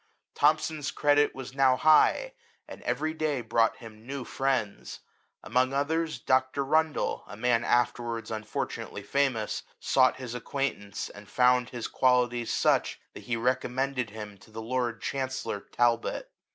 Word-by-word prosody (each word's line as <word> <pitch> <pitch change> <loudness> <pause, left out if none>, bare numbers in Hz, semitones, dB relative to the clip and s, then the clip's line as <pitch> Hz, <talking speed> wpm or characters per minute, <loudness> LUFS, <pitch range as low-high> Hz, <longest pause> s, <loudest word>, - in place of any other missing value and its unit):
Thomson's 155 0 +1
credit 145 0 +2
was 130 -1 -7
now 135 -1 +4
high, 155 - +4 0.3
and - - -10
every 150 +6 -1
day 155 -4 -1
brought 115 0 +2
him 110 -2 -12
new 140 -1 -4
friends; 120 - -2 0.4
among 130 +1 +1
others 155 +2 0
Dr, 130 +3 +1
Rundle, 155 +1 +1
a 105 - -9
man 120 0 +2
afterwards 120 -1 0
unfortunately 110 -1 -4
famous, 130 -6 0 0.2
sought 130 -1 +3
his 125 -3 -6
acquaintance, 125 -5 -3
and 105 0 -13
found 125 -1 +3
his 120 -2 -5
qualities 125 -2 +2
such, - - +2
that - - -11
he 120 - -1
recommended 125 +1 -1
him 105 -2 -9
to - - -18
the 110 +1 -8
lord 120 0 -2
chancellor 130 -6 -3
Talbot. 120 +2 0
125 Hz, 140 wpm, -28 LUFS, 115-140 Hz, 0.4 s, now